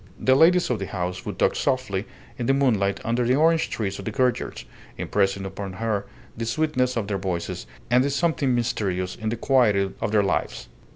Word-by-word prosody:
The 130 Hz, -, +4 dB
ladies 170 Hz, +3 st, +5 dB
of 115 Hz, -, 0 dB
the 95 Hz, -, -4 dB
house 90 Hz, -1 st, -4 dB
would -, -, -4 dB
talk -, -, +2 dB
softly 125 Hz, -6 st, -1 dB, 0.3 s
in 120 Hz, -, -2 dB
the 135 Hz, -, +4 dB
moonlight 100 Hz, -8 st, +2 dB
under 120 Hz, +2 st, +1 dB
the 125 Hz, +2 st, +3 dB
orange 160 Hz, +2 st, +3 dB
trees 100 Hz, -3 st, -3 dB
of 100 Hz, -, -7 dB
the -, -, -2 dB
courtyards, 130 Hz, -3 st, -1 dB, 0.3 s
impressing 100 Hz, -1 st, 0 dB
upon 95 Hz, 0 st, -6 dB
her 105 Hz, 0 st, -2 dB, 0.3 s
the 115 Hz, 0 st, -4 dB
sweetness 130 Hz, -2 st, 0 dB
of 110 Hz, -3 st, -1 dB
their 100 Hz, -1 st, -2 dB
voices 90 Hz, -3 st, -4 dB, 0.2 s
and 125 Hz, +1 st, +5 dB
the 140 Hz, -, 0 dB
something 140 Hz, -3 st, +1 dB
mysterious 95 Hz, -6 st, -1 dB
in 110 Hz, -, -3 dB
the 115 Hz, -, -2 dB
quietude 105 Hz, -7 st, +2 dB
of -, -, -1 dB
their 105 Hz, -2 st, +4 dB
lives. 95 Hz, -, -2 dB
115 Hz, 195 wpm, -24 LUFS, 100-130 Hz, 0.3 s, ladies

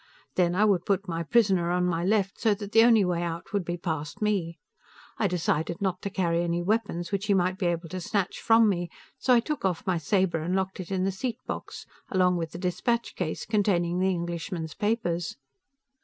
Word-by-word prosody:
Then, 175 Hz, -1 st, +2 dB
I 210 Hz, +3 st, +4 dB
would 195 Hz, -5 st, +2 dB
put 195 Hz, 0 st, +1 dB
my 165 Hz, -1 st, -2 dB
prisoner 190 Hz, -2 st, +2 dB
on 180 Hz, 0 st, +1 dB
my 170 Hz, -1 st, 0 dB
left, 195 Hz, 0 st, +1 dB
so 220 Hz, -3 st, +3 dB
that 205 Hz, 0 st, -8 dB
the 225 Hz, -, +6 dB
only 225 Hz, -4 st, +5 dB
way 175 Hz, -1 st, 0 dB
out 170 Hz, +2 st, -5 dB
would 200 Hz, -2 st, +1 dB
be 175 Hz, +1 st, -3 dB
past 160 Hz, -4 st, -4 dB
me. 195 Hz, -6 st, 0 dB, 0.6 s
I 205 Hz, -, +3 dB
decided 170 Hz, -2 st, -1 dB
not 190 Hz, -3 st, -1 dB
to 200 Hz, -, -3 dB
carry 170 Hz, -3 st, 0 dB
any 170 Hz, 0 st, -1 dB
weapons 200 Hz, -4 st, -1 dB
which 200 Hz, +1 st, -2 dB
he 200 Hz, -, +4 dB
might 185 Hz, +1 st, +1 dB
be 185 Hz, -, +1 dB
able 170 Hz, 0 st, -1 dB
to 185 Hz, +1 st, -5 dB
snatch 190 Hz, +1 st, -1 dB
from 225 Hz, 0 st, +5 dB
me, 175 Hz, -4 st, 0 dB, 0.3 s
so 255 Hz, -, +4 dB
I -, -, +6 dB
took 295 Hz, 0 st, -4 dB
off 190 Hz, +1 st, -1 dB
my 185 Hz, -3 st, +1 dB
saber 185 Hz, 0 st, +1 dB
and 175 Hz, +4 st, -1 dB
locked 190 Hz, 0 st, -2 dB
it 180 Hz, -, -6 dB
in 185 Hz, -1 st, 0 dB
the 195 Hz, -, +1 dB
seat 235 Hz, +4 st, -3 dB
box, -, -, -6 dB, 0.2 s
along 180 Hz, -2 st, +3 dB
with 165 Hz, -1 st, -3 dB
the -, -, -7 dB
dispatch 215 Hz, +6 st, -1 dB
case 160 Hz, -4 st, -3 dB
containing 180 Hz, -5 st, +1 dB
the 190 Hz, +1 st, +2 dB
Englishman's 170 Hz, -2 st, -3 dB
papers. 175 Hz, -8 st, -1 dB
185 Hz, 215 wpm, -27 LUFS, 170-205 Hz, 0.6 s, the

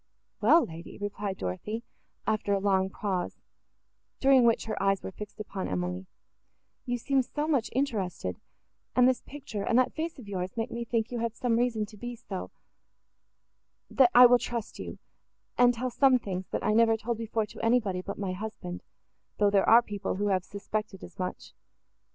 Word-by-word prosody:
"Well, 305 Hz, +11 st, +6 dB
lady!" 165 Hz, +1 st, -10 dB
replied 205 Hz, -1 st, -4 dB
Dorothée, 210 Hz, -, -4 dB, 0.4 s
after 215 Hz, -2 st, 0 dB
a 200 Hz, -, +2 dB
long 190 Hz, -1 st, +2 dB
pause, 190 Hz, -3 st, -3 dB, 0.8 s
during 270 Hz, -2 st, +6 dB
which 230 Hz, -1 st, +3 dB
her 220 Hz, -3 st, -3 dB
eyes 195 Hz, 0 st, +2 dB
were -, -, -5 dB
fixed 210 Hz, +2 st, -9 dB
upon 200 Hz, -2 st, -4 dB
Emily, 90 Hz, +1 st, -3 dB, 0.8 s
"you 245 Hz, 0 st, 0 dB
seem 270 Hz, +3 st, +2 dB
so 295 Hz, +4 st, -3 dB
much 275 Hz, -7 st, +1 dB
interested,—and 220 Hz, -, -2 dB
this 255 Hz, -1 st, +2 dB
picture 270 Hz, -7 st, -7 dB
and 230 Hz, +4 st, +2 dB
that 255 Hz, -, +3 dB
face 320 Hz, +1 st, -4 dB
of 245 Hz, -6 st, -11 dB
yours 185 Hz, 0 st, -4 dB
make 225 Hz, -, -2 dB
me 235 Hz, 0 st, -4 dB
think 230 Hz, 0 st, -1 dB
you 240 Hz, -, -2 dB
have 230 Hz, -1 st, -2 dB
some 245 Hz, -2 st, +1 dB
reason 230 Hz, -2 st, +1 dB
to 210 Hz, 0 st, -14 dB
be 240 Hz, +3 st, -6 dB
so,—that 195 Hz, -4 st, -6 dB, 1.7 s
I 250 Hz, +1 st, +11 dB
will 245 Hz, 0 st, +7 dB
trust 235 Hz, -3 st, -5 dB
you—and 245 Hz, 0 st, -2 dB
tell 250 Hz, +2 st, -2 dB
some 260 Hz, +1 st, +5 dB
things, 190 Hz, -5 st, -5 dB
that -, -, -3 dB
I 215 Hz, -, +2 dB
never 225 Hz, 0 st, +4 dB
told 230 Hz, +1 st, -3 dB
before 225 Hz, -1 st, -1 dB
to 210 Hz, -, -10 dB
anybody, 225 Hz, -6 st, +2 dB
but 200 Hz, +2 st, -6 dB
my 195 Hz, -2 st, -2 dB
husband, 185 Hz, -3 st, -6 dB, 0.6 s
though 205 Hz, -1 st, +3 dB
there 200 Hz, -1 st, +3 dB
are 235 Hz, +2 st, +8 dB
people, 205 Hz, -4 st, -3 dB
who 205 Hz, +2 st, 0 dB
have 185 Hz, -2 st, +1 dB
suspected 205 Hz, 0 st, -5 dB
as 175 Hz, -, -12 dB
much. 185 Hz, 0 st, -5 dB
215 Hz, 175 wpm, -29 LUFS, 195-240 Hz, 1.7 s, I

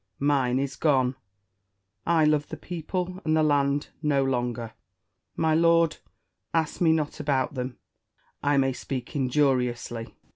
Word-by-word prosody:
Mine 135 Hz, -3 st, +2 dB
is 135 Hz, -1 st, -2 dB
gone: 130 Hz, -4 st, +2 dB, 0.9 s
I 165 Hz, -2 st, +4 dB
love 150 Hz, -1 st, +2 dB
the 160 Hz, -, -6 dB
people 180 Hz, +3 st, -4 dB
and 155 Hz, 0 st, +2 dB
the 155 Hz, -, +3 dB
land 145 Hz, -1 st, +1 dB
no 145 Hz, -3 st, +2 dB
longer. 120 Hz, -3 st, -2 dB, 0.6 s
My 160 Hz, -1 st, +2 dB
lord, 165 Hz, 0 st, +4 dB, 0.6 s
ask 160 Hz, +1 st, 0 dB
me 165 Hz, -2 st, +5 dB
not 155 Hz, -1 st, -1 dB
about 140 Hz, -3 st, 0 dB
them: 125 Hz, -2 st, -4 dB, 0.6 s
I 145 Hz, 0 st, +2 dB
may 135 Hz, -1 st, +2 dB
speak 130 Hz, 0 st, -6 dB
injuriously. 125 Hz, -4 st, 0 dB
145 Hz, 135 wpm, -26 LUFS, 130-160 Hz, 0.9 s, me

